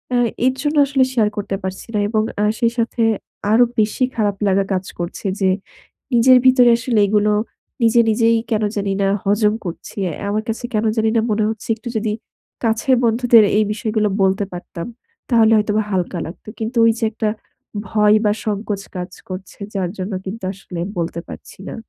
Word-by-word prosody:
এ - - +3 0.3
এর 260 - +2
জন্য 295 0 -1
আসলে 270 -1 +3
শেয়ার 220 -4 +3
করতে 195 -1 -2
পারছি 190 +3 -5
না। 210 - +2
এবং 215 -1 +1 0.2
আ - - +3
সেই 235 -1 +2
সাথে 235 +1 -1 0.5
আরো 230 +3 +6 0.2
বেশি 215 +4 +1
খারাপ 205 -3 0
লাগা 195 0 +3
কাজ 185 0 -1
করছে 175 +4 -5 0.2
যে 190 - +3 0.6
নিজের 250 +2 +6
ভিতরে 255 -1 +6
আসলে 230 -2 0
এগুলো 210 +1 +2 0.5
নিজে 230 +1 +4
নিজেই 230 +1 +3
কেন 215 -1 +1
জানি 200 -1 -1
না 195 - +2 0.2
হজম 210 +1 +2
করছি। 170 - -7 0.3
আমার 215 +1 -1
কাছে 230 +2 -3
কেন 215 +1 +1
জানি 220 0 +2
না - - +4
মনে 210 0 +1
হচ্ছে 220 0 -6
একটু 240 +2 -7
যদি 215 -1 -1 0.5
কাছের 230 +4 +2
বন্ধুদের 230 -1 +5
এই 215 - +4
বিষয়গুলো 215 0 0 0.2
বলতে 190 +1 +2
পারতাম, 175 0 -7 0.4
তাহলে 225 -3 +5
হয়তোবা 210 0 +1
হালকা 180 -1 -1
লাগত। 165 - -11
কিন্তু 225 +2 -3
ওই 230 - +6
যে - - -4
একটা 215 0 -1 0.6
ভয় 210 0 +4
বা 210 - +4
সংকোচ 205 -1 -2
কাজ 180 0 -5 0.2
করছে 185 +2 -8 0.2
যার 185 -3 -1
জন্য 190 +2 -4
কিন্তু 195 +2 -6
আসলে 185 -2 -9 0.2
বলতে 170 0 -2
পারছি - - -11
না। - - -6
215 Hz, 180 wpm, -19 LUFS, 195-230 Hz, 0.6 s, আরো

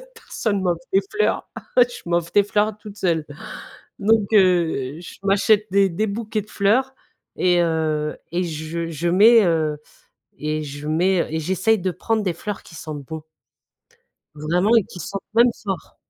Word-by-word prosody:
personne 220 - -3
ne 190 - -2
m'offre 175 -2 0
des 195 - +4
fleurs. 430 - +1 0.3
Je 245 -1 +3
m'offre 170 -1 0
des 205 - +5
fleurs 210 +1 0
toute 210 -1 -11
seule. 165 -5 0 0.7
Donc, 215 0 +3
heu, 170 -7 +2
je 175 - -11
m'achète 205 +2 +3
des 195 0 +4
des 210 +6 -1
bouquets 215 +1 -3
de 210 - -17
fleurs 255 +7 +1 0.4
et 180 -1 +3
heu 155 -2 -1
et 180 +1 0
je 165 0 -4
je 165 +2 -3
mets, 220 +5 +7
heu 155 -3 +1 0.6
et 155 +1 -2
je 145 +1 -8
mets, 175 +3 +2
heu - - -5
et 160 - -1
j'essaye 190 +7 +1
de 185 +1 -1
prendre 220 +5 -1
des 185 -3 0
fleurs 205 +3 -6
qui 165 - -15
sentent 150 -2 -7
bons. 160 +3 -7 1.1
Vraiment 175 +9 +1
et 220 - +4
qui 180 - -11
sentent 195 +2 -5
même 240 +1 +6
fort. 195 -4 -5
185 Hz, 170 wpm, -22 LUFS, 160-210 Hz, 1.1 s, mets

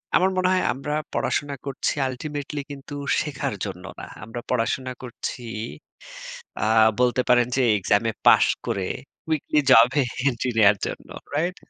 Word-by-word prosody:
আমার 185 +2 +4
মনে 185 - +2
হয় 185 - +2
আমরা 140 +3 -4 0.2
পড়াশোনা 145 0 -1
করছি 140 - -1 0.2
Ultimately 145 +2 -5
কিন্তু 140 +1 -9 0.3
শেখার 140 -7 -3
জন্য 95 -2 -7
না। - - -7 0.2
আমরা 115 +4 -6
পড়াশোনা 125 +2 0
করছি 125 0 -6 1.2
আ - - +1 0.3
বলতে 125 0 +3
পারেন 120 -1 +5
যে 130 - +3
এক্সামে 105 +3 +1 0.2
পাশ - - +7 0.2
করে 95 -2 -1 0.4
উইকলি 150 -1 +1
জবে 125 +4 +6 0.3
এন্ট্রি 125 -1 -2
নেয়ার 105 -1 +6
জন্য। - - -7 0.3
রাইট? 175 +5 0
130 Hz, 140 wpm, -24 LUFS, 115-145 Hz, 1.2 s, পাশ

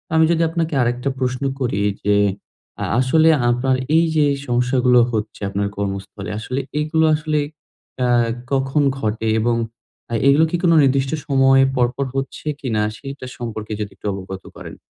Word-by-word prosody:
আমি 160 0 +5
যদি 165 0 +1
আপনাকে 165 -2 -2
আরেকটা 125 +3 0
প্রশ্ন 130 0 -1 0.2
করি, 115 -6 -1 0.2
যে 105 0 +3 0.7
আ - - -1
আসলে 160 +5 +4 0.2
আপনার 130 +2 +1 0.2
এই 165 - +4
যে 150 -1 +4 0.2
সমস্যাগুলো 125 0 +3
হচ্ছে 110 -1 -4
আপনার 100 0 -1
কর্মস্থলে, 100 0 -4
আসলে 125 +5 -3 0.2
এগুলো 160 +1 +1
আসলে 150 0 -1 0.7
আ - - +2 0.4
কখন 135 +2 +1 0.2
ঘটে 110 0 -2
এবং 120 +1 +1 0.6
আ - - -3
এগুলো 145 +4 +5
কি - - 0
কোনো 170 -2 +5
নির্দিষ্ট 135 0 +2 0.2
সময় 135 -1 +5 0.2
পরপর 125 +3 +1
হচ্ছে 135 +2 -4 0.2
কিনা, 110 -5 -1 0.2
সেটার 135 -2 -8
সম্পর্কে 110 -3 -5
যদি 100 -1 -4
একটু - - -17
অবগত 95 0 -7
করেন? - - -9
130 Hz, 155 wpm, -20 LUFS, 110-140 Hz, 0.7 s, আমি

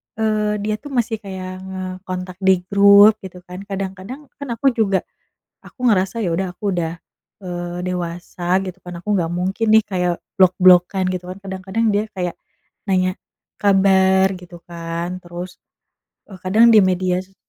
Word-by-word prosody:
eee, 215 -1 0
dia 215 0 -1
tuh 290 - -11
masih 230 -3 0
kayak 185 -2 -7
ngekontak 185 -1 -6
di 190 -2 +3
grup 200 +2 +7
gitu 180 -1 -11
kan. 180 +1 -8
Kadang-kadang 195 +8 -6
kan 285 - -6
aku 270 +3 +2
juga 205 -5 +1 0.6
aku 250 - -9
ngerasa 210 0 +1
ya 170 - 0
udah 190 0 -1
aku 200 -2 -2
udah, 165 -1 -1 0.5
eee, 175 0 -5
dewasa 175 +1 -2
gitu 185 0 -7
kan 180 0 -8
aku 210 - -11
nggak 165 -2 -1
mungkin 190 +5 -1
nih 220 -1 +6
kayak 180 -3 0 0.2
blok-blokkan 185 0 +5
gitu 180 -1 -5
kan. 185 - -8
Kadang-kadang 190 +4 -2
dia 210 +1 +1
kayak 180 -2 -3 0.5
nanya 185 -1 +1 0.5
kabar 190 -1 +4
gitu 175 -1 -13
kan, 170 +1 -5
terus 175 +1 -8 0.7
e - - -10
kadang 215 +5 +5
di 215 - +8
media 185 -1 +1
so 195 +1 -27
190 Hz, 155 wpm, -20 LUFS, 180-200 Hz, 0.7 s, di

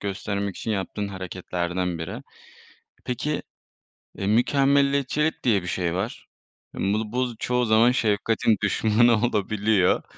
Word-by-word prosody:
göstermek 100 0 -3
için 110 - -4
yaptığın 100 0 -3
hareketlerden 90 -2 -3
biri. 80 - -6 0.8
Peki, 145 +5 -2 0.8
eee, 100 - -3
mükemmeliyetçilik 140 +5 +2
diye 105 -6 +3
bir 90 - -8
şey 85 0 -1
var. 100 +6 -4 0.5
Hımm, 100 +1 0
bu 110 0 -2
bu 125 0 +1
z 120 - -8
çoğu 125 0 0
zaman 110 +2 +5
şefkatin 110 -1 +1
düşmanı 110 +3 +3
olabiliyor. 105 -3 +1
105 Hz, 125 wpm, -24 LUFS, 95-120 Hz, 0.8 s, zaman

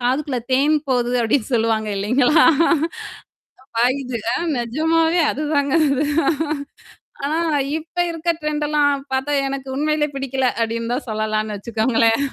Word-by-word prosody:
காதுக்குள்ள 260 +2 -1
தேன் 280 +4 +3
போகுது 245 -2 +1
அப்படின்னு 230 +1 +1
சொல்லுவாங்க 225 -1 +1
இல்லைங்களா? 250 +10 +3 1.3
பாயுது 250 +1 0
அ - - 0 0.2
நிஜமாவே 320 +8 +1
அதுதாங்க 285 -1 -1 0.2
அது. 275 +1 +1 1.2
ஆனா 305 +2 -1 0.4
இப்ப 320 +2 -15
இருக்க 335 0 -2
ட்ரெண்டெல்லாம் 295 -2 +1
பார்த்தா 265 +2 -1 0.2
எனக்கு 270 0 -5
உண்மையிலே 300 0 +1
பிடிக்கல, 270 -1 -2 0.2
அப்படின்னு 230 +1 -2
தான் 265 - -4
சொல்லலான்னு 215 -1 -2
வச்சுக்கோங்களேன். 225 +2 +1
265 Hz, 110 wpm, -20 LUFS, 230-295 Hz, 1.3 s, தேன்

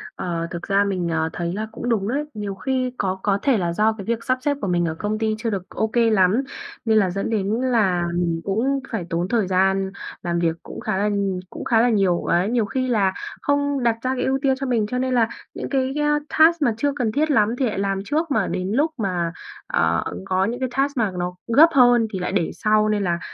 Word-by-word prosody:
Ờ, 170 -1 -3
thực 170 - -5
ra 200 +1 +2
mình, 185 -3 -1
ờ, 160 -1 0
thấy 170 0 -3
là 215 +3 -3
cũng 245 - -5
đúng 210 -4 +1
đấy. 280 +6 0
Nhiều 205 -2 -4
khi 255 +4 -1
có 190 -1 -1
có 200 -1 +1
thể 270 -5 +3
là 170 -3 -1
do 215 +3 +2
cái 195 - -7
việc 230 0 -2
sắp 255 0 +1
xếp 285 +1 0
của - - -2
mình 175 -1 +1
ở 160 -1 -2
công 210 +1 -2
ty 220 -1 0
chưa 230 +1 -2
được 195 -3 -4
ô 220 - -1
kê 230 0 +2
lắm, 210 +4 +3 0.4
nên 220 -1 +3
là 195 -3 +3
dẫn 195 +4 -3
đến 205 -3 0
là 210 -9 +2
mình 170 -1 -1
cũng 245 +8 0
phải 210 -7 -3
tốn 170 +1 -1
thời 215 -2 +1
gian 190 +1 +1 0.3
làm 170 -1 -1
việc 165 -1 +1
cũng - - -9
khá 215 -3 -2
là 205 +1 +1 0.4
cũng - - -8
khá 225 -2 +3
là 245 - +3
nhiều. 195 -6 +2
Ấy, 180 +5 +2
nhiều 235 -3 +1
khi 255 +4 -2
là 200 -6 +2 0.3
không 285 -2 0
đặt 230 -1 +3
ra 260 +2 -1
cái 250 - -2
ưu 265 +1 +1
tiên 270 -2 +2
cho 275 - -3
mình, 230 -4 +1
cho 250 - -3
nên 255 0 0
là 235 -3 +3 0.3
những - - -5
cái, 265 -1 0
a, 295 0 +2 0.2
task 325 +1 +6
mà 235 -5 +3
chưa 285 +4 0
cần 240 -6 0
thiết 305 +4 +1
lắm 220 -3 +3
thì 265 - +2
lại 210 -5 -2
làm 195 -1 0
trước. 315 +4 -1
Mà 220 -7 +1
đến 185 +1 -2
lúc 295 +7 +2
mà, 180 -5 -1 0.4
ờ, 85 0 +1 0.2
có 185 +1 +1
những 240 +4 -3
cái 260 - -1
task 275 0 +1
mà 215 -4 +1
nó 180 0 -3 0.2
gấp 320 +4 +8
hơn 245 -3 +5
thì 190 - -2
lại 180 - -2
để 185 -4 0
sau 215 0 +2
nên 210 -1 +1
là 175 -2 0
215 Hz, 250 wpm, -22 LUFS, 190-255 Hz, 0.4 s, gấp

